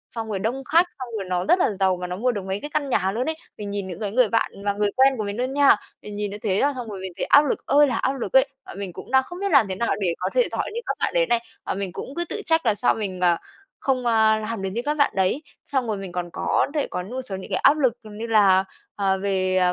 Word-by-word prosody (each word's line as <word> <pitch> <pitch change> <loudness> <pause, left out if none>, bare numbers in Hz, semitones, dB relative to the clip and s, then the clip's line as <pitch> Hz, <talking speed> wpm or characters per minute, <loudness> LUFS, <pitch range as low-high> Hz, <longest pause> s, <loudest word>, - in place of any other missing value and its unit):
xong 225 -1 -4
rồi 200 -3 -2
đông 245 +6 -2
khách, 325 +6 +4
xong 255 - -5
rồi 195 - -4
nó 180 0 0
rất 360 - +4
là - - +3
giàu 190 -1 +3
và 180 0 -5
nó 180 - -4
mua 250 +6 +1
được 205 -5 -5
mấy 190 +1 -2
cái 295 - -6
căn 285 -3 0
nhà 190 -5 +1
luôn 235 +5 -2
ấy. 320 - -2 0.2
Mình 205 -1 -5
nhìn 200 -1 -3
những 180 - -7
cái 205 -2 -3
người 250 +1 +4
bạn 225 +1 +1
và 200 - +2
người 205 0 +1
quen 270 +1 +5
của 215 - -2
mình 200 0 -4
luôn 255 +2 -1
nha, 285 -3 +6 0.3
mình 210 - -8
nhìn 205 -1 -2
như 205 - -5
thế 205 -2 0
á, 285 +1 +2
xong 245 -3 -6
rồi 200 -2 -6
mình 190 -1 -5
thấy - - -1
áp - - +7
lực 280 - -2
ơi 290 +1 +5
là 255 - -1
áp 265 - 0
lực 240 -7 -5
ấy. 265 +1 +6 0.2
Và - - -9
mình 195 -2 -6
cũng - - -10
đang 265 0 +5
không 350 +6 -9
biết 400 0 -1
làm 270 -8 +5
thế 190 - -3
nào 235 +4 -1
để 180 -4 +1
có 180 - -1
thể - - +4
giỏi - - -2
như 465 - -2
các - - -1
bạn - - 0
đấy - - +3
này, 235 - +3 0.3
và - - -1
mình 195 -1 -4
cũng 265 +9 -7
cứ 345 - -2
tự 425 - -4
trách 325 -3 +2
là 220 -3 +3
sao 200 - +2
mình, 195 -4 -4
à, 175 -2 +4 0.4
không, 255 -2 0
a, 220 -2 +4
làm 215 -1 -4
được 195 - -2
như 225 +5 -3
các 295 - +1
bạn 285 - +3
đấy. 190 +10 +1 0.3
Xong 265 -4 0
rồi 215 -2 -1
mình 195 -2 -7
còn 175 -1 -4
có - - +1
thể 300 -2 0
có 180 - -4
một 250 +8 -5
số 210 -7 -6
những 190 - -8
cái - - +1
áp 280 +3 +6
lực 260 -6 +2
như 215 +1 -7
là, 200 -4 +5 0.3
ờ, 195 -1 +1
về 185 -1 0
220 Hz, 310 wpm, -23 LUFS, 195-265 Hz, 0.4 s, áp